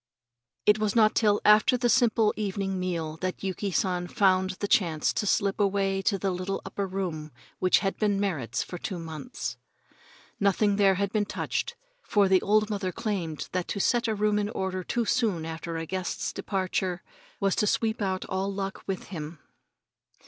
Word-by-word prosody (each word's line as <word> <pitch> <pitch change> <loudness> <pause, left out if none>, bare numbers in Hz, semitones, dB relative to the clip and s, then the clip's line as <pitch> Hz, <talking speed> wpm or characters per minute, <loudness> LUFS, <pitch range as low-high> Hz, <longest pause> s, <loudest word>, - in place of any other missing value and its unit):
It 210 +1 +5
was 215 0 0
not 215 -2 +5
till 210 -2 +3
after 215 +4 +6
the 245 0 +1
simple 230 -3 +3
evening 195 -2 -2
meal 165 -4 -3
that 185 +3 -4
Yuki 195 +1 -2
San 180 -1 0
found 190 -3 +3
the 205 - -1
chance 165 -7 +2
to 210 - -1
slip 200 0 +1
away 195 -1 +1
to 195 +1 +1
the 195 0 -1
little 185 +2 -3
upper 195 0 -3
room 175 -5 -4 0.3
which 185 - +4
had 195 - -1
been 205 -2 +2
Merrit's 155 - -1
for 180 - -7
two 185 - -4
months. 165 - -6 0.8
Nothing 200 +1 +2
there 195 -2 +5
had 200 +1 -1
been 210 -2 +1
touched, - - -2 0.3
for 205 - +2
the 190 -1 +4
old 215 +1 +3
mother 200 -3 -2
claimed 180 -8 -3
that 180 -1 -2
to 200 - -3
set 240 +4 +2
a 220 - 0
room 210 0 +2
in 205 0 -1
order 190 -3 -3
too 235 +6 -1
soon 215 -8 +1
after 165 +1 -5
a 165 - -3
guest's 185 +1 -3
departure 185 -2 -2 0.4
was 195 -1 +1
to 210 - +2
sweep 220 +1 0
out 190 -2 -1
all 190 +1 -2
luck 195 -1 -4
with 195 -2 -4
him. 160 -3 -6
195 Hz, 180 wpm, -27 LUFS, 185-210 Hz, 0.8 s, after